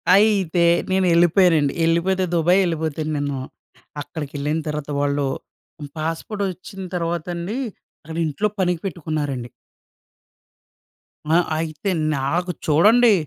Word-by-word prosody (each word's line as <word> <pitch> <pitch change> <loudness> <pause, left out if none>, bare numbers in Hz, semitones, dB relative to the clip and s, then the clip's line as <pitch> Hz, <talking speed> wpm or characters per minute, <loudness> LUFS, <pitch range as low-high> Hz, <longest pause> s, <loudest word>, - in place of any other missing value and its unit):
అయితే, 195 -5 +3 0.3
నేను 190 0 +2
ఎళ్ళిపోయానండి. 170 -4 +4
ఎళ్ళిపోతే 185 +3 +2
దుబాయ్ 175 +3 +4
ఎళ్ళిపోతెను 160 -2 -2
నేను, 145 -1 -2 0.6
అక్కడిడెళ్ళిన 150 +1 -3
తర్వాత 150 -1 -4
వాళ్ళు 145 0 +1 0.7
పాస్‌పోర్ట్ 165 +6 -3
ఒచ్చిన 190 +2 -8
తర్వాత 170 -1 -2
అండి. 180 +8 -4 0.5
అక్కడ 160 +1 -7
ఇంట్లో 180 +8 0
పనికి 180 -3 +1
పెట్టుకున్నారండి. 145 -8 -3 1.8
ఆ! 165 - +5 0.2
అయితే 160 +3 -3 0.3
నాకు 175 +7 -1 0.2
చూడండి. 215 +9 +6
165 Hz, 100 wpm, -22 LUFS, 150-185 Hz, 1.8 s, చూడండి